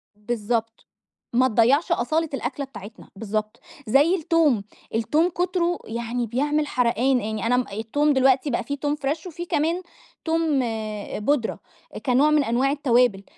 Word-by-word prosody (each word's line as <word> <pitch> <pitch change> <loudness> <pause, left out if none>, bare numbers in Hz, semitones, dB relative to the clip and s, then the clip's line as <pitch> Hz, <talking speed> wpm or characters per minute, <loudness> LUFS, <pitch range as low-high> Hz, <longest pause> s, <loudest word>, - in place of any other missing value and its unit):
بالضبط. 225 +1 -3 0.5
ما 255 +2 +4
تضيّعش 260 - +3
أصالة 320 +2 +1
الأكلة 275 +2 -3
بتاعتنا، 215 -4 -12
بالضبط، 215 +1 -3 0.3
زي 285 +10 +4
التوم، 310 - +2 0.3
التوم 300 +10 +2
كتره 350 0 -1
يعني 235 +1 -3
بيعمل 295 +5 0
حرقان، 250 +1 +2
يعني 215 +1 -3
أنا 245 +2 +3
م 250 - +1
التوم 285 +8 +1
دلوقتي 265 +2 +3
بقى 240 -1 -1
في 285 - -3
توم 290 +1 -1
فريش 300 +4 -3
وفي 345 +1 -6
كمان 330 +3 0 0.4
توم 320 -3 +1 0.7
بودرة، 280 -5 0 0.5
كنوع 265 +3 +4
من 300 -1 +4
أنواع 255 +3 +1
التوابل، 245 -8 +2
265 Hz, 140 wpm, -24 LUFS, 230-300 Hz, 0.7 s, ما